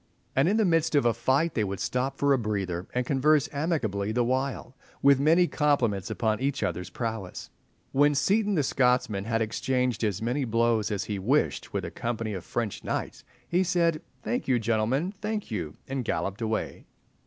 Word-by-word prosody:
And 140 +6 +4
in 210 - +2
the 220 - +3
midst 165 -3 +2
of 140 - +3
a 120 - +4
fight 130 +8 +1
they 110 - +1
would 100 -2 -3
stop 130 +2 -1
for 140 0 +3
a - - +3
breather, 95 -5 -2
and 125 0 -1
converse 145 +2 +3
amicably 120 - -1
the 120 +2 +1
while, 130 0 -2 0.3
with 140 -1 +6
many 165 +5 +5
compliments 130 - +1
upon 110 -2 0
each 135 +1 -1
other's 90 -1 -2
prowess. 110 -6 -5 0.4
When 145 +2 +4
Seaton 200 +8 +2
the 150 - +2
Scotsman 125 -7 +1
had 115 0 +1
exchanged 125 +1 -1
as 100 -3 0
many 125 +5 -1
blows 115 -2 +1
as 100 -2 -1
he 105 -2 -4
wished 130 +10 0
with - - -2
a - - -6
company 115 -2 -3
of 95 -3 -5
French 115 -4 -3
knights, - - -4 0.2
he 175 +2 +2
said, 170 -3 +1 0.2
"Thank 245 - -2
you, 130 -2 +3
gentlemen, 115 - 0
thank 210 - -3
you!" 85 -8 -4
and 135 -1 -2
galloped 100 -2 -2
away. 110 -1 -3
125 Hz, 185 wpm, -27 LUFS, 110-145 Hz, 0.4 s, with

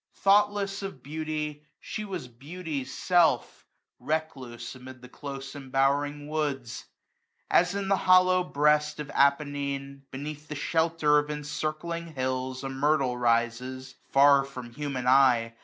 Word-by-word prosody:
Thoughtless 200 0 +3
of 195 -10 -7
beauty, 150 0 -4 0.2
she 215 - -5
was 185 -10 -5
beauty's 145 +3 -6
self. 175 -1 +1 0.3
Recluse 145 -7 -4
amid 130 0 -11
the - - -9
close 135 0 -8
embowering 145 +2 0
woods. 145 -6 -3 0.7
As 180 +2 +3
in 200 -1 -2
the 195 - +3
hollow 185 0 +5
breast 150 -1 +2
of 150 -1 -5
Appenine, 140 -1 0
Beneath 150 +2 -7
the 150 - -6
shelter 160 0 +2
of 145 0 -4
encircling 155 +3 -4
hills,. 130 0 -2
21a - - -5
A - - -3
myrtle 135 -1 +1
rises, 125 +2 0 0.2
far 140 0 +6
from 125 -3 -9
human 140 -2 -4
eye. 125 -3 +4
145 Hz, 130 wpm, -27 LUFS, 130-155 Hz, 0.7 s, far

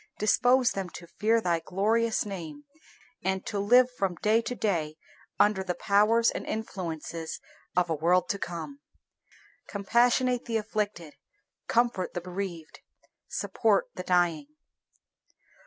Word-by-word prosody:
Dispose 245 +4 +3
them 195 -2 -4
to 175 - -8
fear 220 +6 +1
Thy 175 -6 0
glorious 220 +7 0
name, 195 - -7 0.6
and 190 0 -1
to 205 - -3
live 245 +5 +5
from 195 -7 -2
day 215 +6 +2
to 245 - -4
day 165 -9 -1 0.4
under 205 -2 +3
the 180 -2 -2
powers 210 +5 +3
and - - -5
influences 170 -6 -5 0.4
of 180 -1 +3
a 165 - 0
world 170 +4 +2
to 200 - -1
come. 175 - -6 0.9
Compassionate 240 +4 +2
the 230 -2 0
afflicted; 205 -7 -3 0.5
comfort 235 -7 +1
the 175 - -2
bereaved; 180 -3 -6 0.5
support - - +1
the - - -6
dying. 175 - +1
200 Hz, 125 wpm, -28 LUFS, 175-230 Hz, 0.9 s, live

